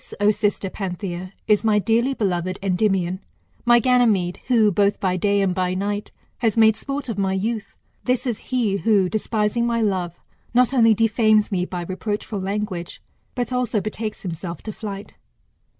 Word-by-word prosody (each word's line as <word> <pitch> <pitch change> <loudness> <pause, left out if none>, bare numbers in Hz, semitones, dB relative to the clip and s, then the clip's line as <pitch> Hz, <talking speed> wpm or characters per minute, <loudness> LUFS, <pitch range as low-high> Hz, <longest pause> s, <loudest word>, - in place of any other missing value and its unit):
O 205 +1 +5
sister 205 -1 -1
Panthia, 185 -2 -5 0.2
is 210 0 +3
my 215 -2 +3
dearly 235 +6 +2
beloved 185 -3 -1
Endymion, 185 -1 +1 0.5
my 240 0 +6
Ganymede, 220 -8 +2
who, 225 -5 +4
both 200 +2 +2
by 185 -2 0
day 200 +2 +2
and 190 -2 +1
by 185 0 -1
night, 205 +2 -3 0.3
has 225 -2 +1
made 220 -1 +6
sport 275 +4 -5
of 220 -4 -3
my 190 -1 +1
youth. 215 +3 -3 0.3
This 250 +1 0
is 235 -4 -2
he, 235 -6 +1
who, 200 -3 +3
despising 215 +3 0
my*love, 195 -7 -1 0.4
not 250 +1 +4
only 225 -4 +5
defames 215 -1 +3
me 180 -2 0
by 180 -1 -5
reproachful 205 +2 -4
lan^age, 195 -3 -3 0.4
but 245 0 -2
also 245 -3 0
betakes 215 +1 -5
himself 170 -2 -6
to 215 - -5
flight. 200 -2 -7
210 Hz, 160 wpm, -22 LUFS, 190-225 Hz, 0.5 s, my